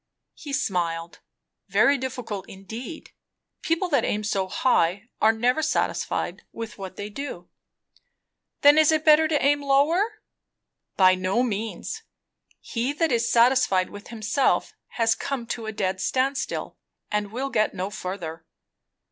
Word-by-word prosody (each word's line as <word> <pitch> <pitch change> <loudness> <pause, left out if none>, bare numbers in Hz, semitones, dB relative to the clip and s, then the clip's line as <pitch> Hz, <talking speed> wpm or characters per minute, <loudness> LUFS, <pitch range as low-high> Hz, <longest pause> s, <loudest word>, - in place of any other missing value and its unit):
He 290 - -9
smiled. 170 -9 -2 0.5
"Very 280 - +4
difficult 250 -7 -5
indeed. 225 - -8 0.5
People 330 +3 0
that 285 - +2
aim 210 +1 -1
so 195 -3 -1
high 200 -1 +1
are 220 - +6
never 245 +6 +1
satisfied 310 - -1
with 225 -2 -7
what 190 -1 -7
they 205 - -5
do." 210 -6 -7 1.1
"Then 290 +1 +7
is 315 0 +5
it 315 0 +1
better 310 0 +6
to 300 -3 +1
aim 290 +1 +3
lower?" 325 +11 +2 0.7
"By 185 -1 +7
no 185 +6 +1
means! 225 - -3 0.6
He 245 +4 -2
that 325 +1 0
is 235 -1 +1
satisfied 235 -6 +4
with 205 0 -10
himself 225 +4 0 0.2
has 225 -1 +3
come 265 -4 -4
to 225 -2 -7
a - - -2
dead 190 -3 -2
stand 270 +2 +1
still; - - -4 0.3
and 210 -1 -1
will 265 +4 -3
get 215 -3 +1
no 190 +2 -3
further." 175 -4 -6
230 Hz, 140 wpm, -25 LUFS, 195-280 Hz, 1.1 s, Then